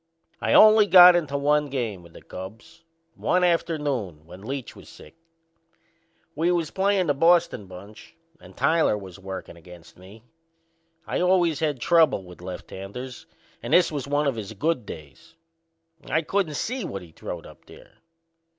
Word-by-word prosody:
I - - 0
only 215 -1 +7
got 180 -2 +9
into 150 -5 -1
one 150 +1 +1
game 120 -9 -4
with 85 -1 -17
the - - -14
Cubs 115 - -11 0.3
one 180 0 0
afternoon 145 - -1
when 90 +3 -13
Leach 130 +3 -6
was - - -15
sick. - - -16 1.2
We 165 +4 0
was 170 -3 -1
playin' 195 -1 +1
the 145 - +1
Boston 165 - +2
bunch 95 +4 -13 0.2
and - - -17
Tyler 160 -9 +2
was 95 -2 -11
workin' 95 -2 -8
against 85 0 -16
us. 100 +4 -15 0.8
I - - -2
always 180 -4 +2
had 150 -5 -1
trouble 160 - +3
with 90 -1 -14
lefthanders 95 +7 -9 0.3
and - - -4
this 180 - +4
was 145 -3 -5
one 145 +1 0
of 135 -5 -1
his 110 0 -7
good 130 +1 -2
days. 75 -3 -12 0.7
I 160 - +1
couldn't 175 -3 -1
see 250 - -3
what 95 -2 -6
he 85 - -15
throwed - - -8
up - - -16
there. - - -17
140 Hz, 160 wpm, -24 LUFS, -, 1.2 s, got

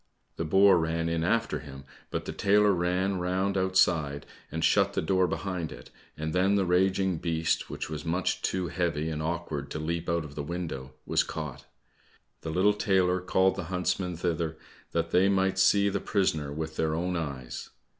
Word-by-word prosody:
The 80 - -2
boar 95 +2 +6
ran 80 0 -1
in 85 -1 0
after 115 +6 +1
him, 70 -2 -10 0.3
but - - -3
the - - -4
tailor 105 +1 +4
ran 90 +1 0
round 95 +2 0
outside 90 -6 +2 0.3
and 80 +1 0
shut 100 -1 +3
the - - 0
door 95 +2 +2
behind 90 -5 -3
it, - - -11 0.3
and 80 +1 -3
then 95 +2 +3
the 100 -2 +2
raging 95 0 +2
beast, 80 0 -1
which - - -4
was 80 -1 -5
much 85 +2 -1
too 90 -2 -1
heavy 80 -3 -1
and 75 0 -3
awkward 80 -3 -3
to - - -4
leap 85 +2 -3
out 85 -2 0
of 75 - -10
the 75 - -4
window, 70 -5 -5
was - - +2
caught. 75 -5 -6 0.7
The 80 - -5
little 95 +6 +3
tailor 95 -3 +2
called 95 +1 +2
the 95 -2 -4
huntsmen 90 0 -1
thither 85 -2 -2 0.3
that 85 0 -1
they 95 +2 +4
might 95 -1 +1
see 100 +1 +5
the 100 - 0
prisoner 80 -7 0
with 80 +1 -5
their 80 -1 +1
own 90 +2 -1
eyes. 70 -7 -5
85 Hz, 185 wpm, -28 LUFS, 80-95 Hz, 0.7 s, boar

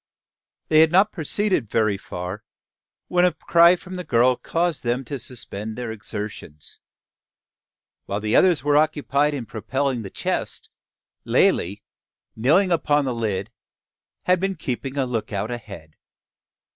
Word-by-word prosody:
They 155 - +5
had 160 0 +6
not 190 +4 +4
proceeded 180 - -1
very 110 -2 +2
far, 90 +1 -6 0.6
when 180 0 +2
a 180 - +4
cry 170 +1 +5
from 185 +1 -9
the 180 - -4
girl 125 -3 +3
caused 170 +3 -1
them 125 +2 -1
to 140 +3 -5
suspend 110 -3 -6
their 120 -2 -4
exertions. 105 -8 -8 1.3
While 100 - -2
the 105 +1 0
others 180 -7 +4
were 145 0 +3
occupied 150 -1 +1
in 125 -4 -5
propelling 130 +3 -2
the 100 - -7
chest, - - -3 0.5
Lalee, 100 +4 +2 0.5
kneeling 160 - +3
upon 150 -3 +2
the 130 - -1
lid, 105 -3 -2 0.7
had 180 0 +3
been 195 +1 -1
keeping 135 -2 -4
a 135 - +2
lookout 110 -3 -3
ahead. 100 -10 -9
130 Hz, 135 wpm, -23 LUFS, 110-160 Hz, 1.3 s, had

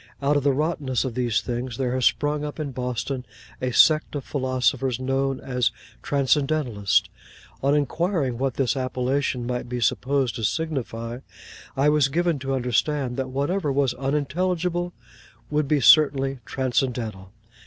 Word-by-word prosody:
Out 145 +1 +2
of 145 - +3
the 140 +1 +3
rottenness 140 -3 -1
of 130 - -3
these 120 -2 0
things, 120 -1 -4
there 125 -2 -1
has 130 -1 0
sprung 150 0 +1
up 150 +1 -5
in 145 -3 -3
Boston 125 +1 -3 0.4
a 130 - 0
sect 155 +4 +4
of 140 - -3
philosophers 130 -2 0
known 135 +1 0
as 125 -3 0 0.3
Transcendentalists. 135 -7 +1 0.5
On 140 +2 +3
inquiring 150 - 0
what 135 -2 -1
this 135 -1 +1
appellation 130 0 -1
might 125 0 -3
be 125 0 -3
supposed 130 +1 +1
to 115 - -5
signify, 120 -4 -2 0.6
I 140 +2 +4
was 150 -2 +4
given 170 +1 0
to 135 0 -2
understand 125 +1 0
that 130 -1 -2
whatever 145 +5 -1
was 135 -2 +1
unintelligible 175 +6 -1 0.6
would 150 -1 +1
be 150 0 +2
certainly 135 -1 +5
transcendental. 120 -7 -2
135 Hz, 145 wpm, -24 LUFS, 125-145 Hz, 0.6 s, certainly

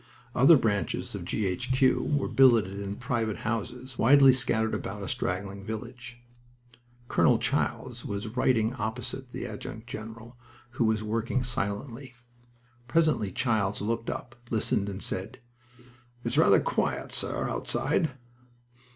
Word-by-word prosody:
Other 145 +6 +7
branches 105 -5 -1
of - - -6
G. 105 - -1
H. 95 +7 -2
Q. 130 0 +3 0.2
were 140 - -1
billeted 115 -7 +4
in 100 0 -4
private 115 -3 -2
houses, 120 +3 -4
widely 135 +2 +7
scattered 110 -3 +1
about - - -4
a - - -5
straggling 100 +2 -3
village. 120 +3 -7 0.9
Colonel - - +4
Childs - - -2
was 100 +2 -4
writing 115 -1 +1
opposite 110 -3 -4
the - - -6
adjutant 110 +1 -7
general, 115 +1 -9 0.3
who 120 -1 0
was 110 -1 +1
working 115 +4 -1
silently. 120 +2 -3 0.7
Presently 155 -8 +2
Childs 105 -3 0
looked 115 +2 -2
up, 120 0 -5
listened, 105 -2 0
and 100 0 -5
said: 100 +7 -2 0.9
"It's - - -2
rather - - +6
quiet, - - -1
sir, - - -1
outside." 145 +6 0
115 Hz, 130 wpm, -28 LUFS, 105-130 Hz, 0.9 s, Other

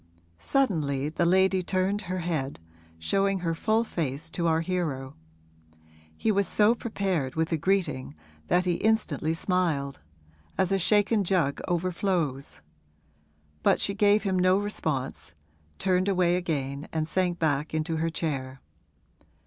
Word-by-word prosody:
Suddenly 150 - 0
the 170 +2 0
lady 190 +1 +4
turned 190 +3 0
her 185 - -1
head, 155 -5 -2 0.4
showing 195 - 0
her 165 -2 0
full 220 +7 +1
face 160 - -4
to 170 0 -1
our 160 0 +2
hero. 160 -7 -2 1.0
He 220 - +1
was 200 -2 +1
so 210 +4 +4
prepared 190 - -2
with 160 +1 0
a - - +3
greeting 155 - -1 0.3
that 180 +1 +2
he 175 -1 +1
instantly 170 -8 +1
smiled, 165 -6 0 0.6
as 190 0 +1
a 195 - +2
shaken 210 +3 +3
jug 170 -7 +1
overflows; 170 - -1 1.0
but - - +3
she 200 - 0
gave 205 0 +3
him 190 -3 +1
no 185 +1 +4
response, 135 - -3 0.4
turned 185 0 +1
away 180 -2 +3
again 145 -5 -2
and 155 -1 -1
sank 180 0 0
back 150 -2 0
in 155 0 -1
her 165 -1 -1
chair. 135 -5 -3
175 Hz, 135 wpm, -27 LUFS, 150-195 Hz, 1.0 s, lady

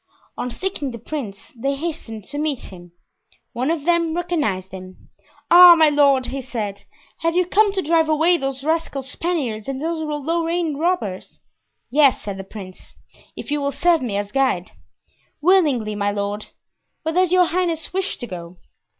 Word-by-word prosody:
On 250 - -3
seeing 310 0 -3
the 235 - -7
prince 230 -5 -7
they 275 +4 -1
hastened 275 -8 -5
to 290 +8 -6
meet 295 -8 -3
him. 175 -1 -13 0.6
One 255 +4 -1
of 320 -3 -1
them 335 -2 +2
recognized 295 - -1
him. 185 0 -11 0.4
"Ah, 350 0 +10
my 315 -2 +5
lord," 280 -3 +4
he 270 +1 -4
said, 210 -6 -5 0.3
"have 330 0 0
you 365 0 +3
come 410 +3 +3
to 380 -2 -1
drive 320 0 +2
away 320 +3 +4
those 270 -2 -4
rascal 315 -3 -1
Spaniards 265 -7 -3
and 270 -1 -3
those 325 +2 -2
Lorraine 325 +2 -1
robbers?" 305 - -2 0.5
"Yes," 280 0 +4
said 200 -2 -5
the 195 - -6
prince, 190 -2 -11 0.4
"if - - -8
you 295 0 0
will 280 0 0
serve 330 +4 +2
me 220 -6 -2
as 205 0 -3
guide." 260 -10 0 0.7
"Willingly, 295 - +3
my 205 0 -1
lord. 205 +1 -3 0.6
Where 320 0 -1
does 365 0 +2
your 365 -1 +5
highness 340 -2 -2
wish 385 +1 -1
to 245 - -6
go?" 175 -4 -9
290 Hz, 165 wpm, -21 LUFS, 220-335 Hz, 0.7 s, Ah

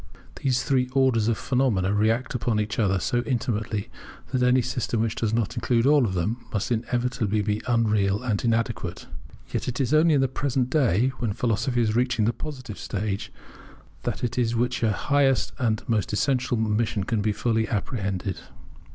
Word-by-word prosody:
These 130 -2 0
three 130 -3 +1
orders 130 -5 +3
of 115 -2 +1
phenomena 115 -8 +1
react 110 +4 +1
upon 120 -2 0
each 105 +1 -2
other 95 -4 +2
so 120 +6 0
intimately, 115 -5 -2 0.4
that 130 -1 0
any 125 0 +4
system 120 -1 -2
which 115 -1 0
does 110 -2 -1
not 115 -2 0
include 120 -1 +1
all 145 -2 +5
of 95 -4 -2
them 110 +8 -2
must 115 +4 -2
inevitably 115 -3 0
be 105 +1 -1
unreal 105 -3 +2
and 110 -5 -1
inadequate. 115 -6 -1 0.5
Yet - - -2
it 125 +1 -3
is 135 +1 +1
only 155 0 +5
in 140 - +3
the 135 - +3
present 130 -1 -1
day, 125 - +3
when 115 -5 -1
Philosophy 120 +3 0
is 110 -1 0
reaching 120 -3 +2
the 115 - +1
positive 130 - -7
stage, 100 0 -3 0.7
that - - -2
this 120 -1 0
which 120 +1 0
is 115 - +1
her 105 - -1
highest 140 -3 +2
and 110 -4 0
most 110 -5 0
essential 125 +1 +1
mission 110 -1 0
can 105 +2 -1
be 105 +1 +1
fully 110 +1 0
apprehended. 100 -3 -2
115 Hz, 175 wpm, -25 LUFS, 105-125 Hz, 0.7 s, all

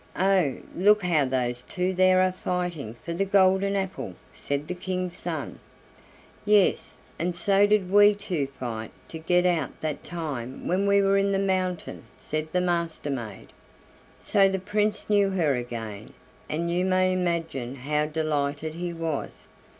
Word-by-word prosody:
"Oh! 185 -7 +3 0.2
look 205 +3 +4
how 160 -5 +2
those 125 -2 -1
two 185 +3 -2
there 185 0 +4
are 185 0 +3
fighting 175 -10 -3
for 170 - -3
the 185 +4 0
golden 195 0 +3
apple," 190 -1 -3 0.2
said 140 +1 -3
the 180 - -2
King's 180 0 -3
son. - - -5 0.8
"Yes, 210 -2 +3 0.2
and 175 +1 -1
so 200 +2 +3
did 205 -3 +2
we 205 +1 +7
two 180 -9 -2
fight 120 -5 -6 0.2
to 160 - -7
get 180 +2 +2
out 170 -6 0
that 155 -2 -3
time 145 -7 -5
when 190 +3 +1
we 200 0 +4
were 195 0 +3
in 200 0 +1
the - - +2
mountain," 185 -2 -2
said 155 0 -4
the 180 - +1
Master 170 -4 -1
maid. 115 -7 -6 0.7
So 195 -1 +3
the 190 - -1
Prince 210 +2 -1
knew 205 -2 +3
her 170 -7 +1
again, 115 -4 -6 0.4
and 170 +2 -1
you 175 +1 +1
may 185 0 +2
imagine 165 -8 -2
how 150 +3 -1
delighted 155 -1 -2
he 175 +1 -4
was. 165 -3 -4
175 Hz, 160 wpm, -26 LUFS, 150-190 Hz, 0.8 s, we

